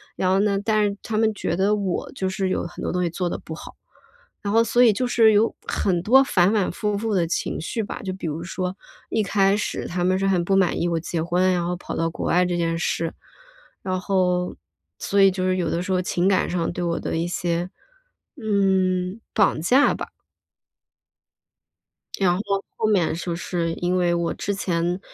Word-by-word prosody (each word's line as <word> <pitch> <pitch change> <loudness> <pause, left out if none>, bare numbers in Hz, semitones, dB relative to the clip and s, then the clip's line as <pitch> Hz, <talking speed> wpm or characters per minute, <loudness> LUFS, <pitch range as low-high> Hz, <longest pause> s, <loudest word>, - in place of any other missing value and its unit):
然 185 - 0
后 190 - +3
呢 200 -1 +2
但 215 -1 +2
是 200 -1 -1
他 220 - -4
们 220 0 +3
觉 170 - -2
得 200 +3 +2
我 195 -4 -2
就 190 - -2
是 190 0 -1
有 - - -1
很 170 - -8
多 - - -1
东 180 0 0
西 170 - 0
做 175 0 -2
得 - - -3
不 160 - -8
好， - - -10 0.7
然 205 0 -2
后 230 0 +5
所 240 +2 +2
以 225 -3 +6
就 250 +5 -1
是 225 -3 +5
有 215 +3 +3
很 180 -4 0
多 265 +5 +6
反 190 -4 +3
反 205 -4 +1
复 210 +2 -2
复 220 0 -2
的 170 -3 +2
情 170 - -2
绪 220 +7 -3
吧， - - -6
就 185 -1 -3
比 185 - -7
如 155 +2 -4
说 185 +1 -4 0.3
一 220 - +1
开 195 +1 +2
始 - - -3
他 175 0 -2
们 185 +1 +2
是 195 - 0
很 180 -3 +1
不 195 - +2
满 190 -3 +2
意 175 - +1
我 170 -1 0
结 165 0 -3
婚， 180 +2 +2
然 175 -1 0
后 180 - -1
跑 - - -7
到 165 0 +1
国 - - -5
外 180 +1 +3
这 175 -1 -1
件 165 -1 0
事， 165 -1 -1 0.7
然 185 -1 -2
后 180 -2 0 0.4
所 200 0 +1
以 195 - +7
就 185 0 -3
是 185 0 +1
有 170 -3 -1
的 170 - -1
时 190 - -4
候 185 0 +2
情 180 0 -1
感 195 - +2
上 170 -2 -1
对 175 - -5
我 170 -1 -1
的 - - -3
一 170 +1 -1
些， 175 0 -2 0.7
嗯， 190 -2 +1
绑 200 -6 +3
架 260 - +4
吧。 - - -6 2.1
然 180 -2 +3
后 200 -1 -2
后 220 - 0
面 195 -6 +2
就 170 0 -3
是 170 -1 -2
因 180 +1 -1
为 175 -1 +2
我 170 -1 -1
之 200 - -3
前 175 -1 -1
185 Hz, 230 characters per minute, -23 LUFS, 175-200 Hz, 2.1 s, 以